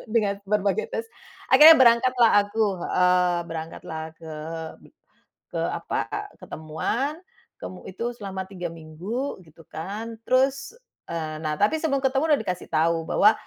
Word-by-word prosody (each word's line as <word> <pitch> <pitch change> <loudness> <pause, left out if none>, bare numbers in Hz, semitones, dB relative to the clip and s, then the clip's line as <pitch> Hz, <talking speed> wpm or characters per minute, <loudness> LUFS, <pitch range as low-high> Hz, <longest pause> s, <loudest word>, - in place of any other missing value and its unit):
Dengan 200 -3 +1
berbagai 200 -1 0
tes, 225 0 -3 0.4
akhirnya 305 +4 +9
berangkatlah 240 -1 +5
aku, 215 +2 0 0.2
heeh. 180 -1 +3
Berangkatlah 160 0 -6 0.2
ke 160 -1 -8 0.5
be - - -17 0.6
ke - - -7
apa, - - -2 0.3
ketemuan, 160 - -3 0.4
kemu 185 - -8
itu 190 +5 -6
selama 195 -5 -6
3 185 -2 -6
minggu, 170 - -5
gitu 165 -1 -18
kan. 215 +9 -7
Terus, 270 - +1 0.3
eee, 155 -2 -4
nah 155 -1 -2
tapi, 210 - +2
sebelum 275 -4 0
ketemu 265 +2 +2
udah - - -6
dikasih 180 -2 -4
tau, 165 +1 +2
bahwa, 210 +2 +5
200 Hz, 135 wpm, -25 LUFS, 165-240 Hz, 0.6 s, akhirnya